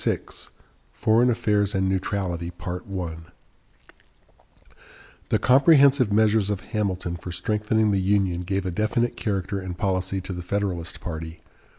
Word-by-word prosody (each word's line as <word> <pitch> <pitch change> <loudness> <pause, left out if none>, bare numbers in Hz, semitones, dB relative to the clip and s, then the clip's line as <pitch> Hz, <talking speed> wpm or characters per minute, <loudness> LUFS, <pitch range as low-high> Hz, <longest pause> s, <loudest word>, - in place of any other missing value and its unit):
VI - - +2 0.8
FOREIGN 115 +3 +3
AFFAIRS 105 -3 +1
AND 95 0 +1
NEUTRALITY 95 -3 -2 2.8
The - - +3
comprehensive 140 -3 +5
measures 105 -1 +3
of 100 -1 -2
Hamilton 95 -5 -2
for 90 +1 -7
strengthening 105 +4 +1
the 95 -1 +1
Union 95 -2 +1
gave 95 +2 -2
a 90 - -1
definite 110 +5 0
character 100 -1 -2
and 90 -2 -6
policy 95 0 -1
to 95 +1 -6
the 90 - -5
Federalist 90 -2 -3
party. 80 -1 -6
100 Hz, 120 wpm, -24 LUFS, 90-110 Hz, 2.8 s, comprehensive